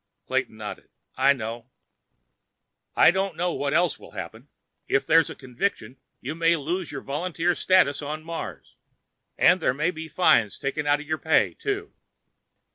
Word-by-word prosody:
Clayton - - -2
nodded. - - -8 0.3
"I 135 +2 +4
know." 115 -1 -6 1.3
"I - - +7
don't 190 -1 -1
know 175 +1 -1
what 140 0 -2
else 175 +3 +2
will - - -14
happen. - - -8 0.4
If 135 - +1
there's 165 -1 +4
a - - -7
conviction, 130 - -3 0.2
you 135 +5 -5
may 165 +1 +3
lose 170 +3 -3
your 135 - -6
volunteer 170 +4 -1
status 175 -7 +3
on 150 +2 -5
Mars. 165 +1 -7 0.6
And - - +5
there 125 - +1
may 155 +5 +1
be 160 -1 -7
fines 145 - +3
taken 145 +2 -3
out 145 +1 +3
of 150 - -12
your 155 0 -2
pay, 160 - +2
too. 410 0 -4
155 Hz, 160 wpm, -25 LUFS, 140-175 Hz, 1.3 s, I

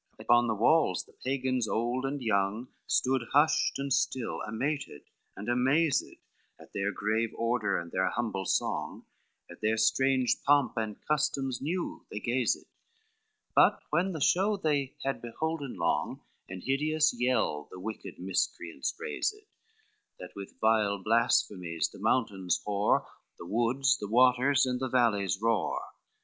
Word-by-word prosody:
XII - - -10
Upon 120 0 +4
the 110 - 0
walls 115 - +3
the - - -22
Pagans 130 -2 -1
old 120 +5 -1
and 140 -1 -4
young 110 +3 0 0.2
Stood 130 0 +2
hushed 150 +2 +3
and 140 -1 -1
still, 130 -2 -1
amated 135 - -3 0.4
and 105 - -7
amazed, 135 +5 +2 0.6
At - - -16
their 100 0 -1
grave 110 +3 0
order 115 -3 0
and 85 0 -6
their 95 0 +1
humble 100 -5 -2
song, - - -2 0.4
At 85 - -13
their 110 +1 +1
strange 130 +1 +2
pomp 145 -1 +3
and 110 -3 -3
customs 135 -4 0
new 170 +5 -3
they 105 - -5
gazed: 120 +1 0 0.9
But - - +5
when 175 +5 +1
the 160 - -5
show 200 +8 +3
they 145 -6 -1
had 135 0 -2
beholden 145 +3 -4
long, 85 -2 -1 0.3
An 90 0 -7
hideous 150 +4 +1
yell 120 -12 0
the 90 - -10
wicked 110 +4 -7
miscreants 90 -2 -2
raised, 455 -2 -2 0.8
That - - -10
with 100 -1 -9
vile 110 -2 +2
blasphemies 95 -5 +1
the - - -12
mountain 100 -4 0 0.2
hoar, 105 0 +1 0.3
The - - -9
woods, 120 +6 +1
the 105 - -4
waters, 125 +4 +4
and 125 -1 -1
the 130 0 -2
valleys 105 -7 +2
roar. 115 0 0
120 Hz, 145 wpm, -29 LUFS, 105-135 Hz, 0.9 s, But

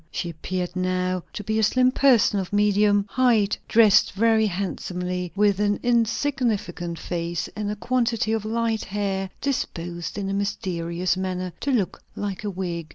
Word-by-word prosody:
She 175 - -4
appeared 180 +3 -4
now 185 0 0
to 210 - -6
be 220 +2 0
a - - +2
slim 255 +4 +4
person, 250 -7 +4
of 185 - -4
medium 205 0 +3
height, 225 -3 +2
dressed 220 -3 +5
very 220 +1 +3
handsomely, 180 -2 -3
with 205 -1 +3
an 205 0 +1
insignificant 230 -7 0
face, 170 -1 -3
and 210 -1 -3
a 210 - -2
quantity 235 -1 0
of 220 -2 0
light 225 0 -1
hair 195 -1 -2
disposed 175 -11 -3
in 200 -1 -2
a 195 - -2
mysterious 180 -3 -1
manner 185 -1 -3
to 285 - -3
look 215 -8 0
like 200 -1 -4
a 210 - -2
wig. 175 -4 -4
200 Hz, 160 wpm, -24 LUFS, 180-220 Hz, -, dressed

